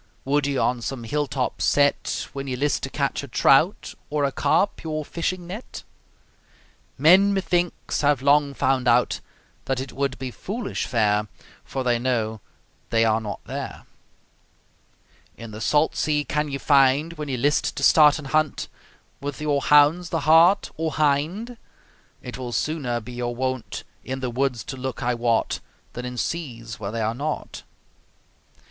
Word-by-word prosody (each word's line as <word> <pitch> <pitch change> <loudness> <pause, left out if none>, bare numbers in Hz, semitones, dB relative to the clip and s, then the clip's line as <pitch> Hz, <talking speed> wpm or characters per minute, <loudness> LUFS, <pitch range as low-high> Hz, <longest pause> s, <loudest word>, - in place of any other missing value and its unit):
Would 140 +1 +1
ye 140 -1 -1
on 125 -1 +1
some 125 0 -4
hill 145 +5 -1
top 130 -1 -2
set, 145 0 +1
When 140 0 -5
ye 130 - -2
list 145 +2 0
to - - -4
catch - - -1
a - - -8
trout, - - +3 0.2
Or 150 -1 0
a 140 - +1
carp, 200 +7 +1
your 155 -2 -3
fishing 175 +3 -3
net? 200 +8 -8 1.1
Men, 185 +8 +6
methinks, 175 -2 -1
have 145 -3 +2
long 140 0 +3
found 130 -1 +1
out 120 +1 +3 0.5
That 135 -1 -1
it 130 0 -6
would 135 0 -2
be 130 -1 -5
foolish 220 - -4
fare, 105 -3 +1 0.4
For 135 - -4
they 120 -1 +1
know 110 -4 -1 0.5
they 115 0 +3
are 110 0 +2
not 105 -2 -6
there. - - -6 1.5
In 115 -1 -9
the 110 +1 -8
salt 150 +7 +2
sea 150 -1 +1
can 150 +1 -1
ye 140 - -3
find, 140 +3 +3
When 150 -3 -6
ye 130 - -1
list 145 +4 +1
to - - -4
start 150 -2 +6
an 155 - -8
hunt, 155 +1 0 0.5
With 145 0 -5
your 145 -2 0
hounds, 150 +5 +4
the 165 - -1
hart 165 +6 +5
or 160 -1 -2
hind? 155 +12 0 0.7
It 125 +1 -7
will 125 -2 -5
sooner 135 -6 -1
be 110 - -10
your 120 0 -3
wont 130 -1 -3 0.2
In 130 +1 -4
the 130 -2 -3
woods 125 -3 -1
to 135 - -7
look, 130 -1 -4
I 125 +1 +1
wot, 115 -1 0 0.3
Than 125 - -6
in 125 0 -6
seas 115 -9 -4
where 100 -2 -4
they 115 +2 -3
are 110 +1 0
not. 145 +5 -4
140 Hz, 165 wpm, -24 LUFS, 125-150 Hz, 1.5 s, Men